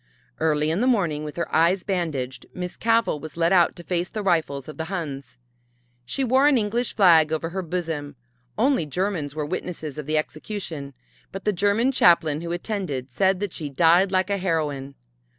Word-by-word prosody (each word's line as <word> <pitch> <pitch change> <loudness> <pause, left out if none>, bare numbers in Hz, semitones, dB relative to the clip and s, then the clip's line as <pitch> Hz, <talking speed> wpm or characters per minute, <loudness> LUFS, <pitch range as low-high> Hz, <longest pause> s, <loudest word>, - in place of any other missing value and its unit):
Early 155 -1 +1
in 175 +6 0
the 250 - +2
morning 175 -12 +1
with 150 -1 -6
her 170 - -4
eyes 175 +3 +3
bandaged 140 - -3
Miss 180 -1 -5
Cavell 230 -8 +1
was 155 +2 -9
led 170 +2 +3
out 175 -3 +4
to 175 - -11
face 175 +1 -2
the 215 - -4
rifles 160 -7 0
of 155 - -9
the 160 - -3
Huns. 155 -8 -5 0.7
She 270 - -2
wore 260 +3 +4
an 290 -3 +4
English 230 +2 -1
flag 165 -6 +6
over 160 +1 -1
her 190 +2 -2
bosom. 160 -5 -4 0.4
Only 240 - +2
Germans 165 -3 -2
were 155 -1 -2
witnesses 155 -3 -5
of 150 - -7
the 155 0 +1
execution, 155 -3 -5 0.4
but 195 - -7
the 210 - +2
German 205 +7 +2
chaplain 165 - +4
who 170 0 -5
attended 175 - -3
said 190 +6 +2
that 205 -4 -3
she 150 -3 -5
died 170 +6 +4
like 185 +1 +1
a 200 - +1
heroine. 150 -7 -2
170 Hz, 185 wpm, -24 LUFS, 150-195 Hz, 0.7 s, flag